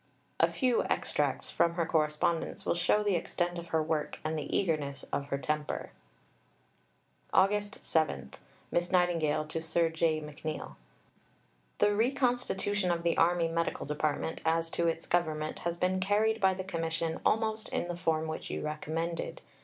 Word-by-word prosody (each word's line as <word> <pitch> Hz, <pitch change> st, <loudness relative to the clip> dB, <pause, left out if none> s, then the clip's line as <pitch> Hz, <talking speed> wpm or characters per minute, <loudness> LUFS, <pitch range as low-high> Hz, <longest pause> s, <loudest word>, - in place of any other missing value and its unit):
A -, -, +4 dB
few 255 Hz, -3 st, +2 dB
extracts -, -, -1 dB
from 170 Hz, 0 st, +2 dB
her 170 Hz, -2 st, +1 dB
correspondence 160 Hz, +1 st, 0 dB
will -, -, +2 dB
show 175 Hz, +5 st, +2 dB
the 205 Hz, -1 st, +2 dB
extent 175 Hz, +1 st, -1 dB
of 170 Hz, -, -8 dB
her 160 Hz, -1 st, +1 dB
work 155 Hz, -1 st, -1 dB
and 155 Hz, +1 st, -1 dB
the 150 Hz, -2 st, -3 dB
eagerness 150 Hz, -7 st, -1 dB
of 140 Hz, -, -1 dB
her 140 Hz, -, -1 dB
temper: 150 Hz, +1 st, -2 dB, 1.4 s
August 205 Hz, +1 st, +2 dB
7 70 Hz, -, 0 dB, 0.4 s
(Miss 175 Hz, +1 st, 0 dB
Nightingale 165 Hz, -4 st, +2 dB
to 160 Hz, +1 st, -4 dB
Sir 165 Hz, +1 st, +2 dB
J. 160 Hz, -1 st, +1 dB
McNeill). 150 Hz, -, -6 dB, 1.0 s
The 205 Hz, -, +4 dB
reconstitution 240 Hz, -5 st, +1 dB
of 170 Hz, -1 st, 0 dB
the 170 Hz, -1 st, +2 dB
Army 170 Hz, 0 st, +3 dB
Medical 165 Hz, +1 st, -1 dB
Department 150 Hz, +2 st, -1 dB
as 165 Hz, 0 st, +1 dB
to 170 Hz, -, +1 dB
its 165 Hz, 0 st, -1 dB
government 155 Hz, -3 st, 0 dB
has 170 Hz, 0 st, -2 dB
been 185 Hz, +1 st, +1 dB
carried 215 Hz, +3 st, +2 dB
by 190 Hz, -1 st, +4 dB
the 190 Hz, -, -4 dB
commission 165 Hz, -2 st, -2 dB
almost 220 Hz, 0 st, +1 dB
in -, -, -1 dB
the 175 Hz, -, -3 dB
form 160 Hz, -2 st, 0 dB
which 155 Hz, -, -5 dB
you -, -, -3 dB
recommended. 160 Hz, +2 st, -3 dB
165 Hz, 155 wpm, -31 LUFS, 155-185 Hz, 1.4 s, A